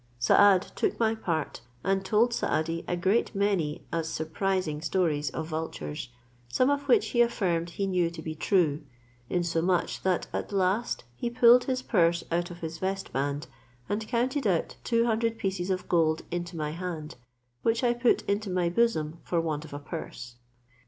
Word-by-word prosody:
Saad 190 +9 +5
took - - 0
my 225 -1 +3
part, 165 - -3 0.2
and 195 0 +1
told 220 +5 +3
Saadi 165 -5 -1
a 175 - -1
great 195 +6 +1
many 195 -7 0
as 165 -1 -1
surprising 160 0 -1
stories 160 -4 0
of 160 - -4
vultures, 155 - -5 0.4
some 255 - +3
of 285 0 -1
which 255 - +4
he 240 - +3
affirmed 180 -8 +1
he 195 +3 -2
knew 180 -3 +1
to 170 -1 -9
be 155 - -4
true, 155 -3 +1 0.5
insomuch 175 0 0
that 185 -2 +1
at - - -3
last 195 +4 0
he 235 - -2
pulled 245 0 +6
his 255 -1 -1
purse 170 -7 +2
out 175 +1 0
of 175 0 -10
his 160 0 -5
vestband, 145 -7 -2 0.4
and 210 +2 -2
counted 250 +2 0
out 175 -4 0
two 230 -1 +2
hundred 230 0 0
pieces 190 -2 -2
of 185 -1 -2
gold 160 -2 +2
into 175 0 -4
my 150 -1 -2
hand, 165 -2 -5 0.5
which 230 +2 +1
I 240 -1 +4
put 240 0 +2
into 200 +1 -1
my 180 -2 +1
bosom 170 -6 +1
for 170 - -1
want 160 -2 -2
of 155 - -12
a - - -3
purse. 135 -5 -7
180 Hz, 170 wpm, -28 LUFS, 160-215 Hz, 0.5 s, pulled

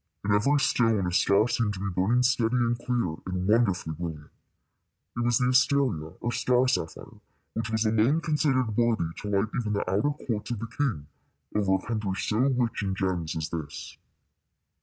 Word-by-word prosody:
In 100 - +2
every 140 +8 +3
stone 115 -7 +2
a 90 - -1
star 100 +4 +3
seemed 115 -4 0
to - - -7
be 100 0 -3
burning 100 +8 +2
steady 125 -2 +2
and 120 -1 +2
clear 120 -9 -2
and 90 0 -2
wonderfully 100 -7 +2
brilliant. 80 -2 -7 0.8
It - - -4
was 120 -1 +3
the 125 0 +1
asteria, 130 - +2
or 120 - -2
star 125 +1 +2
sapphire, 80 -10 -3 0.3
which 110 0 -3
was 110 0 0
alone 110 +8 +3
considered 140 -8 0
worthy 110 -8 +1
to 105 - -5
light 100 +2 +1
even 110 -3 -2
the 100 - -1
outer 100 +9 +1 0.2
courts 110 -3 -3
of 120 - -2
the 115 - -5
king 125 - -1 0.5
over 100 -2 +2
a 95 - -5
country 105 -4 -2
so 105 +3 -1
rich 125 -4 +1
in 95 -2 -2
gems 90 -4 -2
as 80 -1 -3
this. 80 -4 -6
110 Hz, 180 wpm, -27 LUFS, 95-120 Hz, 0.8 s, every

